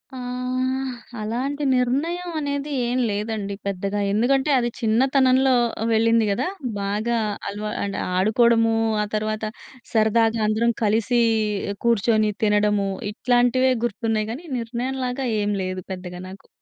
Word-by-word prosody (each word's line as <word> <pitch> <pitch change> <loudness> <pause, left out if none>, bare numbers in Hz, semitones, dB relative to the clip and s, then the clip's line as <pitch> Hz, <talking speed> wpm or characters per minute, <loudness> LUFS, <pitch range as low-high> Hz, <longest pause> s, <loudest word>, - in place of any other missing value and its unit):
ఆహ్, 255 +1 -2 0.3
అలాంటి 260 +7 -2
నిర్ణయం 320 +9 -1
అనేది 285 0 -3 0.2
ఏం 255 +1 0
లేదండి, 205 -1 -3
పెద్దగా. 200 +1 -2
ఎందుకంటే, 265 +7 +2
అది 240 - 0
చిన్నతనంలో 260 +3 +3 0.4
వెళ్ళింది 225 0 +3
గదా! 250 - 0 0.3
బాగా 210 +4 -1 0.3
అలవా 210 +1 -4
అంటే 200 0 -3 0.2
ఆడుకోవడము 225 +3 +3 0.3
ఆ - - -2
తర్వాత 215 0 -2 0.5
సరదాగా 225 +1 +3
అందరం 230 +2 +2
కలిసి 225 +3 +2 0.6
కూర్చొని 220 -1 +3
తినడము, 210 -1 +2 0.2
ఇట్లాంటివే 245 +3 +2
గుర్తున్నాయి 220 -1 -1
గానీ 290 +9 -7
నిర్ణయం 245 +3 -3
లాగా 250 +2 -2 0.2
ఏం 205 0 0
లేదు 185 -1 -4
పెద్దగా 180 -1 -6
నాకు. 190 +1 -13
230 Hz, 115 wpm, -23 LUFS, 210-255 Hz, 0.6 s, చిన్నతనంలో